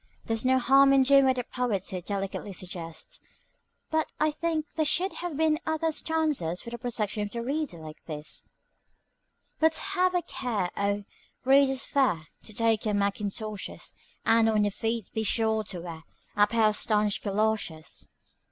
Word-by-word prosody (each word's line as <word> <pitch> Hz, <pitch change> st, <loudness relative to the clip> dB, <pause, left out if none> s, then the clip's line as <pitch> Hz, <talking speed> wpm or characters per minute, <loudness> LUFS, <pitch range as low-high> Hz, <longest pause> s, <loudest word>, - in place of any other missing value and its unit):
There's 225 Hz, -1 st, -1 dB
no 260 Hz, 0 st, +4 dB
harm 275 Hz, +2 st, +6 dB
in 270 Hz, -1 st, +6 dB
doing 275 Hz, +1 st, +6 dB
what 260 Hz, -1 st, +3 dB
the 250 Hz, -, -2 dB
poet 235 Hz, -6 st, -1 dB
so 185 Hz, -2 st, -4 dB
delicately 195 Hz, +1 st, -4 dB
suggests, 175 Hz, -3 st, -6 dB, 0.7 s
but 315 Hz, 0 st, 0 dB
I 310 Hz, 0 st, +3 dB
think 315 Hz, 0 st, -1 dB
there 315 Hz, -, +1 dB
should 355 Hz, +6 st, +1 dB
have 350 Hz, -5 st, -4 dB
been 315 Hz, -1 st, +2 dB
other 315 Hz, 0 st, +1 dB
stanzas 300 Hz, -, 0 dB
for 235 Hz, -, -8 dB
the 235 Hz, -, -6 dB
protection 220 Hz, -4 st, -1 dB
of 205 Hz, -, -2 dB
the 235 Hz, +2 st, -4 dB
reader 280 Hz, -, -2 dB
like 155 Hz, -1 st, -11 dB
this: 150 Hz, -1 st, -4 dB, 1.1 s
"But 320 Hz, 0 st, +4 dB
have 370 Hz, -2 st, +1 dB
a 355 Hz, -, +1 dB
care, 215 Hz, -9 st, -2 dB
oh, 200 Hz, 0 st, 0 dB, 0.4 s
readers 270 Hz, 0 st, +4 dB
fair, 180 Hz, -, +1 dB, 0.2 s
To -, -, -4 dB
take 225 Hz, 0 st, +1 dB
your 210 Hz, -2 st, 0 dB
mackintoshes, 205 Hz, +1 st, -3 dB, 0.3 s
And 225 Hz, 0 st, +5 dB
on 215 Hz, -1 st, +3 dB
your 205 Hz, -, +1 dB
feet 225 Hz, +1 st, -2 dB
be 220 Hz, -, -1 dB
sure 220 Hz, 0 st, +1 dB
to 185 Hz, -4 st, -4 dB
wear 165 Hz, -2 st, -8 dB, 0.3 s
A 205 Hz, 0 st, +5 dB
pair 220 Hz, 0 st, +3 dB
of 210 Hz, -, -1 dB
stanch 210 Hz, -2 st, +1 dB
galoshes. 200 Hz, -6 st, -2 dB
225 Hz, 170 wpm, -28 LUFS, 200-275 Hz, 1.1 s, harm